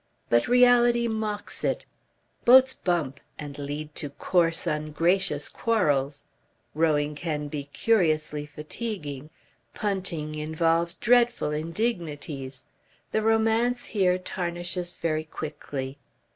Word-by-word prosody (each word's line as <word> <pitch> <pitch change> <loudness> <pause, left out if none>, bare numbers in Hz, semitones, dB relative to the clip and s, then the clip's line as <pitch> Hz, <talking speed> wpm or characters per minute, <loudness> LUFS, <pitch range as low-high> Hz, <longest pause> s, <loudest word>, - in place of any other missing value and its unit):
But 120 0 +3
reality 240 -1 +5
mocks 215 -2 -3
it. - - 0 0.6
Boats 260 +2 +7
bump 155 -7 -1 0.2
and 145 -1 -7
lead 145 +1 -5
to 145 - -3
coarse 165 +3 +1
ungracious 155 +1 0
quarrels; 145 -11 0 0.5
rowing 150 -2 +2
can 150 -1 -3
be 145 -1 -4
curiously 155 -4 +1
fatiguing; 150 - -6 0.5
punting 185 -7 -2
involves 165 +2 0
dreadful 240 -8 +3
indignities. 155 - -3 0.5
The 220 - +1
romance 225 +2 +2
here 185 -4 +2
tarnishes 175 -1 -3
very 155 -2 -1
quickly. 145 -3 -6
165 Hz, 100 wpm, -26 LUFS, 150-215 Hz, 0.6 s, Boats